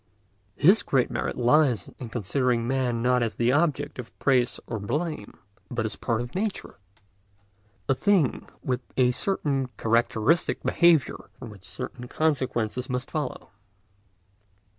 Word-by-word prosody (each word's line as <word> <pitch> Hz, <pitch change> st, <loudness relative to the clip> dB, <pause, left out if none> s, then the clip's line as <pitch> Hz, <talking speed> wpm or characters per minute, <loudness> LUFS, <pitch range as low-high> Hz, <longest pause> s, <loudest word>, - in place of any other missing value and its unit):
His 190 Hz, +8 st, +5 dB
great 130 Hz, -3 st, +1 dB
merit -, -, -2 dB
lies 125 Hz, -1 st, +3 dB
in 120 Hz, -, -6 dB
considering 120 Hz, +2 st, 0 dB
man 125 Hz, -3 st, 0 dB
not 125 Hz, 0 st, +3 dB
as 115 Hz, -2 st, -1 dB
the 120 Hz, +1 st, +2 dB
object 145 Hz, -2 st, 0 dB
of 120 Hz, -, -9 dB
praise 125 Hz, -3 st, +2 dB
or 115 Hz, -, -4 dB
blame, 130 Hz, -, -3 dB, 0.3 s
but 115 Hz, -2 st, -2 dB
as 110 Hz, -, -2 dB
a -, -, -14 dB
part 115 Hz, -1 st, -1 dB
of 120 Hz, 0 st, -7 dB
nature, 200 Hz, -, -4 dB, 1.1 s
a 135 Hz, -, +4 dB
thing 180 Hz, -, +1 dB
with 125 Hz, -1 st, -1 dB, 0.2 s
a 125 Hz, -1 st, +4 dB
certain 140 Hz, -4 st, -1 dB
characteristic 115 Hz, +6 st, +1 dB
behaviour 170 Hz, -5 st, +3 dB
from 125 Hz, -4 st, -9 dB
which 100 Hz, -2 st, -14 dB
certain 125 Hz, 0 st, -7 dB
consequences 125 Hz, -5 st, -1 dB
must 125 Hz, +1 st, -3 dB
follow. 150 Hz, -5 st, -4 dB
125 Hz, 140 wpm, -26 LUFS, 120-145 Hz, 1.1 s, His